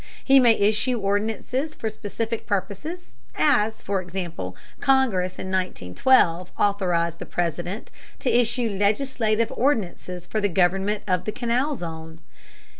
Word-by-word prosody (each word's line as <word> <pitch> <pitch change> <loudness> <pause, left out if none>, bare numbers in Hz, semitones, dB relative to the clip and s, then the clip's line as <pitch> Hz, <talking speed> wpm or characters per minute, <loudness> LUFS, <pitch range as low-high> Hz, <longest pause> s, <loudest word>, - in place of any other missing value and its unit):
He 270 0 +6
may 240 -3 +6
issue 215 +4 +2
ordinances 220 +9 -1
for 225 - -4
specific 220 +1 -4
purposes, 210 - -3 0.2
as, 225 -7 +2
for 195 -1 -1
example, 175 - -5 0.2
Congress 235 -10 +2
in 190 - -5
1912 180 - +2
authorized 175 -4 +1
the - - -7
President 175 +4 -3 0.3
to 255 - 0
issue 240 0 +2
legislative 220 +1 +1
ordinances 185 -8 -1
for 215 +4 -2
the 205 - +2
government 195 +3 +1
of 180 -1 0
the 215 - -1
Canal 245 +6 0
Zone. 160 -4 -7
205 Hz, 125 wpm, -24 LUFS, 180-240 Hz, 0.3 s, He